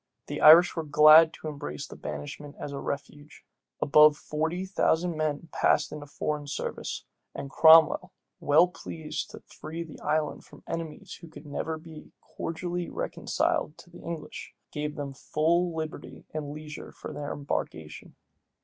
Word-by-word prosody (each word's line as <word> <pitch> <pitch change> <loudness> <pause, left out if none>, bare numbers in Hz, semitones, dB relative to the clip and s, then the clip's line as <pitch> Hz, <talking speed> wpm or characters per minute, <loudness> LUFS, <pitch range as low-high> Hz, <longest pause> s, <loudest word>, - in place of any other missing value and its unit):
The - - -5
Irish 165 +3 +8
were 165 - -1
glad 155 +2 +7
to - - -8
embrace 140 - -6
banishment 75 - -7
as 145 - -5
a 140 - -5
refuge, 145 +1 -7 0.3
Above 150 +1 +6
forty 160 +5 -2
thousand 175 -2 +1
men 155 +1 -2
passed - - +2
into 150 -1 -8
foreign 150 0 -3
service; 145 - -4 0.3
and 140 - -6
Cromwell, 160 0 +6 0.3
well 155 +5 +5
pleased 165 -2 -6
to - - -11
free 160 +2 -8
the 160 - -12
island 155 -1 -1
from - - -17
enemies 165 -3 -6
who 170 - -11 0.2
never 160 +2 -3
could 155 - -12
be 160 -2 -12
cordially 175 +1 -5
reconciled 150 - -1
to 175 - -16
the - - -13
English, 160 -2 -7 0.2
gave 150 0 -4
them 140 -2 -5
full 165 +5 0
liberty 155 -1 -6
and 155 -2 -4
leisure 150 0 -8
for - - -9
their 145 -1 -5
embarkation. 80 - -5
155 Hz, 150 wpm, -28 LUFS, 145-165 Hz, 0.3 s, Irish